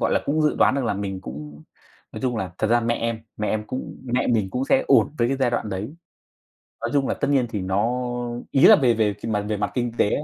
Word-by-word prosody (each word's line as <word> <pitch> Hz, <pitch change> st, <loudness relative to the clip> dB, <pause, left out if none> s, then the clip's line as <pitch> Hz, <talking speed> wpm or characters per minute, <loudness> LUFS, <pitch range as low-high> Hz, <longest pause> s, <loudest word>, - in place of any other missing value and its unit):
gọi -, -, +1 dB
là, -, -, +2 dB
cũng 155 Hz, +2 st, +1 dB
dự 150 Hz, -, +2 dB
đoán -, -, +4 dB
được 135 Hz, -3 st, -1 dB
là 115 Hz, -, 0 dB
mình 95 Hz, -1 st, -4 dB
cũng, 75 Hz, +1 st, -9 dB, 0.5 s
nói -, -, -7 dB
chung 125 Hz, -2 st, 0 dB
là 95 Hz, -4 st, -3 dB
thật 110 Hz, -, +1 dB
ra 120 Hz, +2 st, +3 dB
mẹ 115 Hz, 0 st, 0 dB
em 115 Hz, -1 st, -2 dB, 0.2 s
mẹ 105 Hz, -, -2 dB
em 105 Hz, 0 st, -1 dB
cũng 130 Hz, -, -6 dB
mẹ 125 Hz, 0 st, 0 dB
mình 110 Hz, -5 st, +1 dB
cũng 125 Hz, +6 st, -1 dB
sẽ 265 Hz, -, +2 dB
ổn 150 Hz, -, +4 dB
với 120 Hz, 0 st, +2 dB
cái 135 Hz, -, 0 dB
giai 130 Hz, -2 st, +1 dB
đoạn 120 Hz, -2 st, -2 dB
đấy, 105 Hz, +9 st, -5 dB, 0.9 s
nói -, -, -2 dB
chung 140 Hz, -2 st, +2 dB
là -, -, 0 dB
tất -, -, -2 dB
nhiên 135 Hz, -4 st, +3 dB
thì 105 Hz, -, -3 dB
nó 100 Hz, +6 st, 0 dB, 0.5 s
ý 135 Hz, -, +2 dB
là -, -, +10 dB
về 125 Hz, -5 st, +3 dB
về 105 Hz, -2 st, +1 dB
mặt 105 Hz, -2 st, -1 dB
về 105 Hz, -, -1 dB
mặt 105 Hz, 0 st, -2 dB
kinh 120 Hz, -2 st, -1 dB
tế -, -, +4 dB
ấy 150 Hz, -, -1 dB
115 Hz, 270 wpm, -23 LUFS, 105-130 Hz, 0.9 s, là